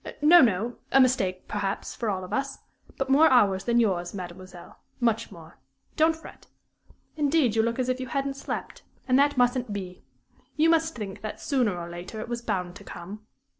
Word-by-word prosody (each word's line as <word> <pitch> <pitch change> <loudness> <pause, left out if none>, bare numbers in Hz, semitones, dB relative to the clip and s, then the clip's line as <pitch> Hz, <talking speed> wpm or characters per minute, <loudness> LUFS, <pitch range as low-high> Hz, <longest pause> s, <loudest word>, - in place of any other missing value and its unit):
"No, 345 +3 +8
no; 230 0 +1
a 270 - +5
mistake, 195 -8 +2
perhaps, 200 -1 -3
for 230 - -3
all 190 -2 -2
of 180 - -8
us; 275 0 -2 0.4
but 270 - -1
more 290 +4 +6
ours 200 -7 +3
than 235 0 +3
yours, 185 -5 0
mademoiselle 180 -1 -10 0.2
much 230 -2 0
more! 160 -4 -14 0.4
Don't 320 +1 +3
fret. 320 - -14 0.7
Indeed, 290 -6 +2
you 225 - +4
look 230 +1 -1
as 255 -1 -1
if 255 0 -1
you 260 - -5
hadn't 275 +2 -2
slept, 275 - -6 0.3
and 255 +1 +4
that 285 -1 +3
mustn't 245 -1 +1
be. 185 -3 -6 0.5
You 320 +1 +4
must 325 0 +1
think 205 -5 -6
that, 215 - -6
sooner 245 -10 0
or 170 -1 -6
later, 175 +5 -8
it 225 - -6
was 240 0 -3
bound 185 -6 -3
to - - -14
come. 210 +5 -10
230 Hz, 190 wpm, -26 LUFS, 190-270 Hz, 0.7 s, No